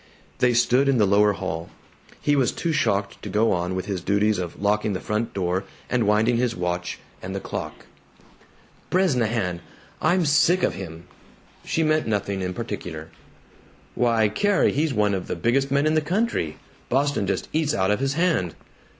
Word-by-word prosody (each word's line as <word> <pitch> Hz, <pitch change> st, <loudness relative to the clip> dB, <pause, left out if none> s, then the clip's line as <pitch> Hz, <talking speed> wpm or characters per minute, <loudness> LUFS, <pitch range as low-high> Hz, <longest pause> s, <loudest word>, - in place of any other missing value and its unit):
They 125 Hz, -1 st, +3 dB
stood 125 Hz, +3 st, +3 dB
in 135 Hz, -, +3 dB
the 105 Hz, -, +4 dB
lower 105 Hz, +1 st, +4 dB
hall. 85 Hz, -4 st, -4 dB, 0.5 s
He 145 Hz, -, +2 dB
was 135 Hz, -3 st, +2 dB
too 170 Hz, -, -2 dB
shocked 100 Hz, -7 st, 0 dB
to -, -, -6 dB
go 110 Hz, +2 st, +2 dB
on 90 Hz, +1 st, -1 dB
with 95 Hz, -, -3 dB
his 95 Hz, -3 st, -3 dB
duties 100 Hz, +2 st, +1 dB
of 90 Hz, -2 st, -5 dB
locking 105 Hz, +1 st, +1 dB
the 95 Hz, -, -2 dB
front 105 Hz, +2 st, -2 dB
door 95 Hz, 0 st, -1 dB, 0.3 s
and 120 Hz, -4 st, +2 dB
winding 110 Hz, +3 st, +3 dB
his 120 Hz, -1 st, 0 dB
watch 90 Hz, 0 st, -3 dB, 0.2 s
and 95 Hz, +1 st, -6 dB
the -, -, -2 dB
clock. -, -, -6 dB, 1.0 s
"Bresnahan! 115 Hz, -, +1 dB, 0.4 s
I'm 175 Hz, +2 st, +3 dB
sick 160 Hz, +5 st, +3 dB
of -, -, +2 dB
him!" 85 Hz, -3 st, -8 dB, 0.6 s
She 160 Hz, -, 0 dB
meant 155 Hz, -2 st, +1 dB
nothing 100 Hz, -2 st, -1 dB
in 90 Hz, 0 st, -3 dB
particular. 90 Hz, -8 st, -6 dB, 0.8 s
"Why, 115 Hz, -3 st, +2 dB
Carrie, 200 Hz, -, +2 dB
he's 155 Hz, +2 st, 0 dB
one 105 Hz, -4 st, +2 dB
of 95 Hz, -2 st, -3 dB
the -, -, -2 dB
biggest 125 Hz, +10 st, +1 dB
men 140 Hz, +2 st, +2 dB
in 155 Hz, -, +2 dB
the 155 Hz, -, +3 dB
country! 175 Hz, -, -1 dB, 0.3 s
Boston 135 Hz, -5 st, +1 dB
just -, -, -1 dB
eats 155 Hz, -1 st, +1 dB
out 95 Hz, +1 st, +1 dB
of 105 Hz, -, +1 dB
his 135 Hz, 0 st, 0 dB
hand!" 165 Hz, -, +1 dB
110 Hz, 175 wpm, -24 LUFS, 95-140 Hz, 1.0 s, the